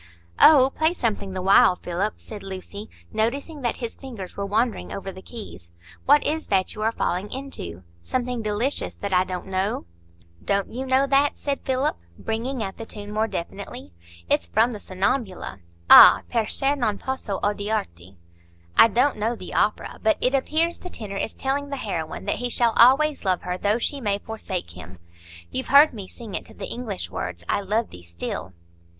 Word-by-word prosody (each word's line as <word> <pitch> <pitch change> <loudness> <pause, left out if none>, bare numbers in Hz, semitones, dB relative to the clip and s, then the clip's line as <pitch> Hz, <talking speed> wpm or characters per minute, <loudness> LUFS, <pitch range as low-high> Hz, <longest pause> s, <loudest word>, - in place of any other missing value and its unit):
"Oh, 275 -4 +7
play 315 +3 +2
something 205 - -2
the 185 -1 -4
while, 190 -1 +6
Philip," 180 +4 -2
said 210 -2 -9
Lucy, 195 +2 -8 0.2
noticing 275 +8 -2
that 240 -2 0
his 235 -2 -5
fingers 230 -9 -8
were 200 0 -3
wandering 210 - 0
over 195 -1 -5
the 190 - -11
keys. 190 - -9 0.4
"What 290 +2 +5
is 315 +1 -1
that 190 -2 +1
you 215 - -7
are 220 +1 +2
falling 185 -2 -2
into?—something 235 - -5
delicious 220 +6 -1
that 200 -1 -4
I 180 0 +5
don't 185 -1 -5
know." 190 - -2 0.6
"Don't 200 +1 0
you 260 +2 -4
know 260 +1 +3
that?" 275 +1 +2
said 280 -1 -2
Philip, 260 - 0 0.2
bringing 230 +2 -3
out 190 -1 -6
the 225 - -6
tune 205 -1 -8
more 215 +1 +1
definitely. 170 - -6 0.3
"It's 85 - +1
from 230 - +2
the 215 - -6
'Sonnambula'—'Ah! 185 - +4
perchè 260 +5 +1
non 220 -7 0
posso 260 -7 -4
odiarti.' 200 - -2 0.6
I - - +8
don't 250 +5 +2
know 225 +3 -1
the 185 - -9
opera, 210 - 0
but 220 0 +3
it 250 - +2
appears 315 +5 +1
the 360 - -8
tenor 210 - -6
is 220 - -3
telling 280 +1 -2
the 280 - -3
heroine 175 -8 -4
that 205 - -1
he 245 0 -2
shall 235 -1 +2
always 280 +5 +5
love 185 -3 0
her 180 0 -2
though 205 +4 +1
she 275 +3 -2
may 205 -3 0
forsake 200 - -5
him. 90 +1 -11 0.5
You've 260 - -3
heard 285 +2 +7
me 200 -5 -7
sing 225 -1 -10
it - - -4
to - - -16
the - - -6
English 225 -6 -5
words, 85 -1 -5
'I - - +1
love 215 +4 -1
thee 90 - -11
still. 85 +2 -6
215 Hz, 180 wpm, -24 LUFS, 185-255 Hz, 0.6 s, I